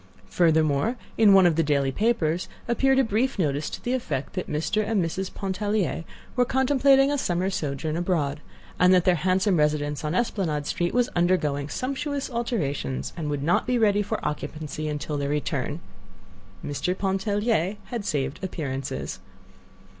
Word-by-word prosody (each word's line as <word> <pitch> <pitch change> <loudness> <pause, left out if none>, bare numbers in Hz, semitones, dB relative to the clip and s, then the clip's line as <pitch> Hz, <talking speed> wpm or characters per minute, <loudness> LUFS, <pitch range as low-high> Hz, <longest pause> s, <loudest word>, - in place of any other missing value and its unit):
Furthermore, 160 - +2 0.2
in 220 -2 +6
one 195 -1 +7
of 170 -3 +4
the - - +4
daily 140 -3 +1
papers 180 - 0 0.2
appeared 265 +3 +3
a 270 - +5
brief 235 +4 0
notice 150 -4 0
to - - -8
the 245 - -1
effect 230 - -3
that 185 - -4
Mr. 160 +8 0
and 215 0 0
Mrs. 185 +3 -3
Pontellier 195 -4 -2 0.3
were 250 - +4
contemplating 270 +2 +4
a 290 - 0
summer 185 -2 0
sojourn 155 -2 -2
abroad, 160 -5 -1 0.4
and 180 +1 +6
that 180 - +3
their 185 - +5
handsome 185 +3 +2
residence 150 -1 0
on 155 +3 -1
Esplanade 175 -10 -1
Street 175 +6 -1
was 245 -1 +3
undergoing 155 -5 +1
sumptuous 275 - -3
alterations, 185 - -2
and 160 -3 -3
would 145 -1 -2
not 170 - +2
be 250 -1 +2
ready 205 -3 +3
for 205 - -2
occupancy 150 +1 -4
until 150 0 -3
their 140 0 -1
return. 145 0 -2 0.9
Mr. 180 +6 -2
Pontellier 200 0 0 0.2
had 235 -4 -3
saved 145 -5 -2
appearances! 140 -7 -4
180 Hz, 155 wpm, -25 LUFS, 150-215 Hz, 0.9 s, one